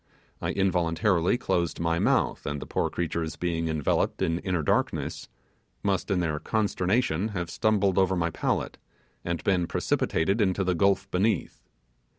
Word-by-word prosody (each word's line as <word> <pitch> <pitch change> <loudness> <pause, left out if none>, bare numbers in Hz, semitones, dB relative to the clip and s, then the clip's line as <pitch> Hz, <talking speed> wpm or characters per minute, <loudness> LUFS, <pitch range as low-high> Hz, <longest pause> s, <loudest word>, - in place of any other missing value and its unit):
I - - -1
involuntarily 90 +2 +1
closed 85 -8 -1
my 85 0 +1
mouth, - - +1
and 75 0 -2
the - - -7
poor - - -1
creatures 85 -2 -3
being 85 -2 -1
enveloped 80 -3 0
in 80 +1 0
inner 90 -4 -1
darkness, - - -1 0.5
must 100 -1 0
in 95 -3 +1
their 75 -3 -1
consternation 105 -2 0
have 85 -1 -3
stumbled 100 -2 +2
over 95 0 +3
my 85 -1 0
palate, - - -2 0.4
and 85 -1 -3
been 90 -3 +1
precipitated 95 +7 0
into 95 -1 +1
the 90 0 +1
gulf 100 +2 +2
beneath. 100 +5 -1
90 Hz, 150 wpm, -27 LUFS, 85-100 Hz, 0.5 s, over